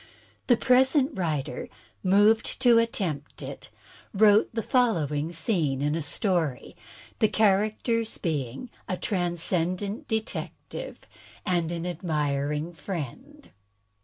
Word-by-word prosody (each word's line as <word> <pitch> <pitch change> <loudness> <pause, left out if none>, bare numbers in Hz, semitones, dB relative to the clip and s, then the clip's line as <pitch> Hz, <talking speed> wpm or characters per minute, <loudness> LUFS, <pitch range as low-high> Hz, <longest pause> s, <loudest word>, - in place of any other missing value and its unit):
The 245 - +5
Present 265 +3 +4
Writer, 150 -8 -2 0.3
moved 205 +4 +3
to 240 -3 +6
attempt 180 -11 -2
it, - - -8 0.5
wrote 210 +1 +5
the 225 -1 -3
fol 245 -1 +3
lowing 150 0 -2
scene 160 -5 0
in 150 +1 +1
a 165 - -1
story, 160 - -1 0.4
the 220 - +5
characters 215 +2 +1
being 155 - -3 0.2
a 185 - -1
Transcendant 180 +2 -1
Detective 225 - -4 0.4
and 175 -4 0
an 170 0 -3
Admiring 150 -2 -1
Friend. 160 -5 -7
180 Hz, 105 wpm, -27 LUFS, 155-220 Hz, 0.5 s, to